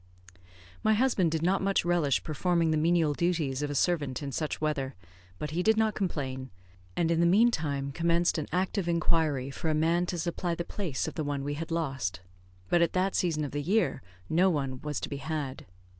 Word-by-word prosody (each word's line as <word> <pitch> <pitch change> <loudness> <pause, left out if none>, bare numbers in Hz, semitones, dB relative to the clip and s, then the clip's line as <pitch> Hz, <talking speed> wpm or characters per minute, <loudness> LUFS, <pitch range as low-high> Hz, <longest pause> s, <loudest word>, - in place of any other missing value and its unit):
My 220 0 +4
husband 215 -7 +2
did 160 0 -1
not 185 +3 +2
much 195 -2 +1
relish 170 -6 +2
performing 165 +1 +1
the 155 - +2
menial 165 -1 +3
duties 155 -5 0
of 145 - -1
a 145 - -3
servant 145 -4 0
in 140 - -4
such 155 +3 -2
weather, 140 -4 -1 0.4
but 150 +7 -4
he 170 +3 0
did 220 +3 +3
not 220 -1 +2
complain, 130 -9 -3 0.5
and 170 -1 +2
in 165 - +2
the 170 - +4
meantime 160 -9 +2
commenced 170 +2 +1
an 150 - -4
active 185 +1 0
inquiry 160 -5 +1
for 160 +4 -3
a 155 - +1
man 170 +3 +2
to 175 - -2
supply 170 +1 -2
the 170 - -4
place 175 -11 -3
of - - -4
the 155 - -3
one 145 -1 -2
we 145 +1 -2
had 160 +2 -5
lost; 135 - -2 0.5
but 175 - +3
at 170 - +2
that 190 +1 +1
season 160 -4 0
of 145 - -6
the 145 - -2
year 200 +9 +1 0.3
no 180 +4 +4
one 135 -6 -2
was 150 -2 -3
to - - -3
be 140 - -5
had. 140 -2 -4
160 Hz, 205 wpm, -29 LUFS, 145-175 Hz, 0.5 s, My